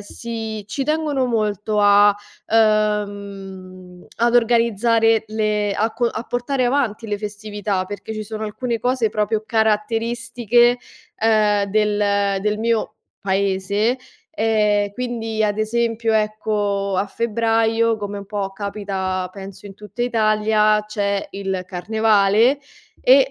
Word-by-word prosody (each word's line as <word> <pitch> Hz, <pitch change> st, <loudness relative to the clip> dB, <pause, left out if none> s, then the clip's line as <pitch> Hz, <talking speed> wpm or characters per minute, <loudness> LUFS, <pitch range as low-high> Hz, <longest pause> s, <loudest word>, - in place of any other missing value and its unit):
sì 220 Hz, 0 st, -6 dB
ci 270 Hz, +2 st, -2 dB
tengono 305 Hz, -3 st, 0 dB
molto 215 Hz, -3 st, -1 dB
a 205 Hz, 0 st, +6 dB, 0.3 s
ehm, 200 Hz, -4 st, -1 dB
ad 235 Hz, +1 st, +2 dB
organizzare 230 Hz, -1 st, +3 dB
le 210 Hz, -1 st, 0 dB
a 220 Hz, +3 st, -1 dB
co 240 Hz, +1 st, -1 dB
a 225 Hz, -, -3 dB
portare 245 Hz, +1 st, -1 dB
avanti 240 Hz, -4 st, 0 dB
le 205 Hz, -, -1 dB
festività, 205 Hz, -2 st, -4 dB
perché 205 Hz, +2 st, -7 dB
ci 215 Hz, -, -4 dB
sono 215 Hz, +1 st, -5 dB
alcune 230 Hz, +2 st, -3 dB
cose 245 Hz, -1 st, +1 dB
proprio 210 Hz, +1 st, -1 dB
caratteristiche, 230 Hz, +2 st, +1 dB, 0.4 s
ehm, 215 Hz, -2 st, +3 dB
del 205 Hz, -2 st, +1 dB
del 210 Hz, 0 st, 0 dB
mio 225 Hz, -1 st, -1 dB, 0.2 s
paese, 200 Hz, +4 st, 0 dB, 0.4 s
ehm, 210 Hz, -4 st, +2 dB
quindi, 225 Hz, -2 st, -3 dB
ad 205 Hz, -1 st, +1 dB
esempio, 230 Hz, +1 st, 0 dB
ecco, 210 Hz, -2 st, 0 dB
a 200 Hz, -, 0 dB
febbraio, 225 Hz, +1 st, +1 dB
come 205 Hz, -1 st, -5 dB
un 200 Hz, -, -9 dB
po' 200 Hz, -2 st, -3 dB
capita 195 Hz, -2 st, -3 dB
penso 195 Hz, -1 st, -10 dB
in 195 Hz, -1 st, -9 dB
tutta 210 Hz, +4 st, -6 dB
Italia 215 Hz, -2 st, +2 dB
c'è 200 Hz, -1 st, -2 dB
il 190 Hz, -2 st, -3 dB
carnevale 215 Hz, +5 st, +2 dB, 0.4 s
e, -, -, +5 dB
215 Hz, 120 wpm, -20 LUFS, 205-230 Hz, 0.4 s, a